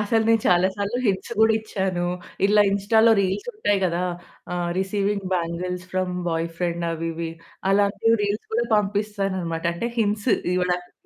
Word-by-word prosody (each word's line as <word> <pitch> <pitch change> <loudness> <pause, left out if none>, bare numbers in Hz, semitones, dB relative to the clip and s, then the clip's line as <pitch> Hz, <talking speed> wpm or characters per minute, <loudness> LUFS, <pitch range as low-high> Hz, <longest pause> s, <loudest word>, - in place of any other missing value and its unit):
అసలు 220 +2 +2
నేను 225 -1 +4
చాలా 180 +1 +4
సార్లు 205 +4 -2
హింట్స్ 190 -2 -1
గూడా 220 0 +5
ఇచ్చాను. 190 -5 -2 0.4
ఇలా 210 0 +5
ఇన్‌స్టాలో 220 +3 +4
రీల్స్ 195 - -1
ఉంటాయి 205 - +1
గదా! 175 0 0 0.5
ఆహ్, 175 -1 -1
రిసీవింగ్ 200 0 -1
బ్యాంగిల్స్ 180 +1 -3
ఫ్రమ్ 185 -1 -1
బాయ్‌ఫ్రెండ్ 170 +1 -2
అవి 165 0 -3
ఇవి, 165 0 -4 0.4
అలాంటివి 200 +3 +3
రీల్స్ 205 +1 -1
కూడా 235 - +2
పంపిస్తాననమాట. 195 -5 -1
అంటే 235 +7 -2
హింట్స్ 210 +2 +1 0.2
ఇవ్వడానికి. 180 0 -1
195 Hz, 140 wpm, -23 LUFS, 180-210 Hz, 0.5 s, గూడా